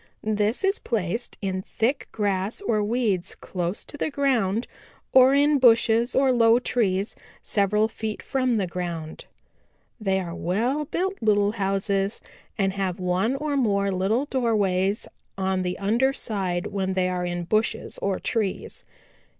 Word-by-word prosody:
This 215 - +1
is 390 +1 +2
placed 225 0 -2
in 190 -1 -1
thick 240 +8 -1
grass 200 -1 -1
or 220 - 0
weeds 205 -5 0
close 180 +1 -4
to 290 - -7
the 310 - -1
ground 245 -7 +1 0.5
or 260 +1 +7
in 290 0 +4
bushes 235 -1 +4
or 265 -1 +4
low 230 -1 +5
trees 210 -5 0 0.3
several 210 +1 +2
feet 220 -1 -5
from 255 -3 0
the 200 - +1
ground. 170 -3 -5 0.7
"They 195 -3 +1
are 175 -3 -5
well 240 - -1
built 380 +6 -2
little 205 -2 +3
houses 195 0 -1 0.4
and 195 -2 +1
have 190 -2 -2
one 185 +7 0
or 295 +1 -2
more 200 -6 +1
little 195 +8 +1
doorways 205 -7 0 0.3
on 190 -1 0
the 180 0 -2
under 235 +7 +2
side 190 -8 -2
when 190 -1 -2
they 185 -1 +1
are 180 -1 -2
in 175 0 -2
bushes 215 +6 -1
or 195 -1 -1
trees. 210 -5 -2
210 Hz, 145 wpm, -25 LUFS, 190-240 Hz, 0.7 s, or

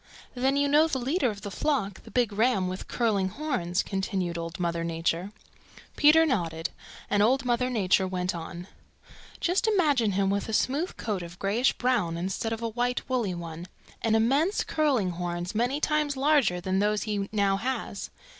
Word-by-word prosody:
"Then 265 +2 +1
you 285 0 +2
know 300 +3 +5
the 290 - -1
leader 265 +2 +1
of 205 -2 -6
the 205 - -5
flock, 215 -6 -1
the - - -11
big 240 -4 +1
ram 215 -3 +2
with 185 +1 -5
curling 205 -6 +1
horns," 215 - -1
continued 190 -3 -2
Old 165 +2 -5
Mother 170 -1 -1
Nature. 170 +3 -1 0.6
Peter 315 +2 +6
nodded, 165 - -1 0.4
and 205 0 +2
Old 255 +5 +3
Mother 250 +1 +1
Nature 195 -5 +2
went 180 0 -2
on. 175 +1 -7 0.7
"Just 365 +5 +1
imagine 290 - +3
him 195 0 +1
with 200 +2 -1
a - - -3
smooth 290 +11 0
coat 210 -5 -2
of 170 0 -9
grayish 215 +8 +1
brown 230 -10 0
instead 190 +5 -2
of 225 0 -3
a 230 - -1
white 245 +2 -1
woolly 235 -8 -1
one, 170 0 -7 0.3
and 225 -1 +2
immense 275 - +2
curling 270 - +1
horns 175 0 -4
many 245 +6 0
times 300 -2 0
larger 270 -10 +3
than 190 +2 -1
those 210 +1 +1
he 205 -2 -2
now 200 -2 +2
has. 235 -3 -3
215 Hz, 175 wpm, -27 LUFS, 185-260 Hz, 0.7 s, Peter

